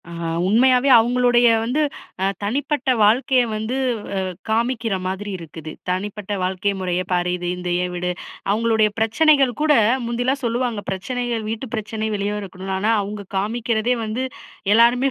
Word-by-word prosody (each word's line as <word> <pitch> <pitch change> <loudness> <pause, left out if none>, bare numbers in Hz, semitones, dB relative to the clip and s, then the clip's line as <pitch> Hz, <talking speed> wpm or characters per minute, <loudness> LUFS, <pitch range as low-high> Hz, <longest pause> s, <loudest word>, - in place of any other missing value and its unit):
ஆ - - -9 0.4
உண்மையாவே 250 +5 +4
அவுங்களுடைய 245 +1 +3 0.2
வந்து 250 +7 0 0.4
அ - - +3 0.2
தனிப்பட்ட 275 +5 -1
வாழ்க்கைய 250 +4 +4
வந்து 220 +4 -3 0.4
அ - - +1 0.3
காமிக்கிற 225 -1 0
மாதிரி 190 +2 -4
இருக்குது. 160 -2 -9 0.2
தனிப்பட்ட 205 +2 -3
வாழ்க்கை 190 +2 0
முறைய 180 -1 -1
பாரு! 180 0 +1
இது 175 0 -5
இந்த 180 0 -4
ஏன் 180 - -3
வீடு, 180 0 -1 0.4
அவுங்களுடைய 220 0 +2
பிரச்சனைகள் 270 +3 +4
கூட 305 -1 +4 0.3
முந்தியெல்லாம் 245 +3 -1
சொல்லுவாங்க, 235 -2 -1
பிரச்சனைகள் 230 +3 -3
வீட்டு 225 +4 -4
பிரச்சனை 220 0 -3
வெளிய 200 0 -1
வரக்கூடாதுன்னு, 190 -1 -5
ஆனா, 215 +3 +2
அவுங்க 205 0 -6
காமிக்கிறதே 230 +3 0
வந்து 225 +4 -2 0.5
எல்லாருமே 240 +4 +5
220 Hz, 140 wpm, -21 LUFS, 195-245 Hz, 0.5 s, எல்லாருமே